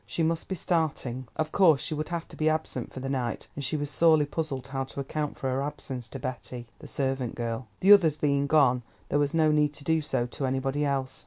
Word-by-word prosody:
She 165 - 0
must 165 0 0
be 190 - -2
starting. 145 -8 -1
Of 155 0 -1
course, 165 -8 +5
she 160 - -1
would 155 +1 -3
have 170 -1 -3
to - - -11
be 155 0 +2
absent 155 -6 -2
for 130 - -7
the 135 - -4
night, 130 -3 -2
and 140 - -5
she 155 - 0
was 145 0 -3
sorely 160 -2 +5
puzzled 145 -4 -3
how 135 0 -3
to 135 - -8
account 150 +2 -3
for 135 - -3
her 130 +1 0
absence 135 -4 -5
to 135 - -6
Betty, 125 -1 -6
the - - -10
servant 135 -3 -2
girl; 115 0 -3
the 195 +2 +9
others 165 -7 +5
being 140 -1 +1
gone 135 -4 +4 0.3
there 145 - +2
was 145 +2 +1
no 155 -1 +4
need 150 -1 +2
to 145 - -7
do 160 +2 +2
so 130 -5 -1
to 130 +2 -3
anybody 135 +3 0
else. 135 -2 -2
140 Hz, 240 wpm, -28 LUFS, 130-155 Hz, 0.3 s, the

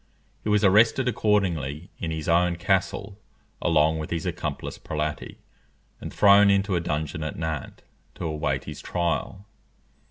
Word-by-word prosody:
He - - -2
was 105 0 +3
arrested 110 +6 +4
accordingly 90 - 0
in 85 - -3
his 80 -1 -4
own 85 +1 +3
castle, 95 +2 -1 0.4
along 80 -1 +2
with 75 - -5
his 85 -2 -3
accomplice - - -4
Prelati, 75 0 -4 0.6
and - - -7
thrown 100 0 +6
into 100 -1 +2
a - - +2
dungeon 75 -1 -3
at 75 - -5
Nantes 80 -3 -5 0.3
to - - -5
await 75 -4 -2
his - - -8
trial. 90 +3 -2
85 Hz, 140 wpm, -25 LUFS, 75-100 Hz, 0.6 s, thrown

